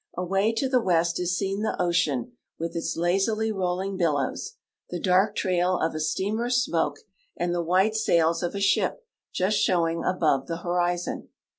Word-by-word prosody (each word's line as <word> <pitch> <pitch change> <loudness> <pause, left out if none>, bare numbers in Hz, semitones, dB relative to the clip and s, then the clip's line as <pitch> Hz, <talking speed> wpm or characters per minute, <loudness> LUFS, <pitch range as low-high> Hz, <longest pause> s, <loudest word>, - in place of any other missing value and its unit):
Away 195 +4 +1
to 245 +4 0
the 255 -1 +2
west 170 -4 +1
is 180 0 0
seen 195 +1 -2
the 220 - -2
ocean 165 -8 +1 0.3
with 165 +1 -4
its 165 - -2
lazily 195 +6 +1
rolling 190 0 -2
billows, 150 -6 -1 0.4
the 175 - -4
dark 190 +4 +2
trail 180 -1 +1
of 160 - -1
a 155 - -4
steamer's 210 +10 -1
smoke, 155 -4 -1 0.4
and 175 0 -1
the 175 - 0
white 185 +5 +2
sails 170 -6 +2
of 175 +2 -3
a - - -2
ship 200 - +1 0.3
just 195 +3 +1
showing 165 -2 +1
above 155 -7 +1
the 165 - -3
horizon. 175 0 -1
180 Hz, 165 wpm, -26 LUFS, 170-195 Hz, 0.4 s, the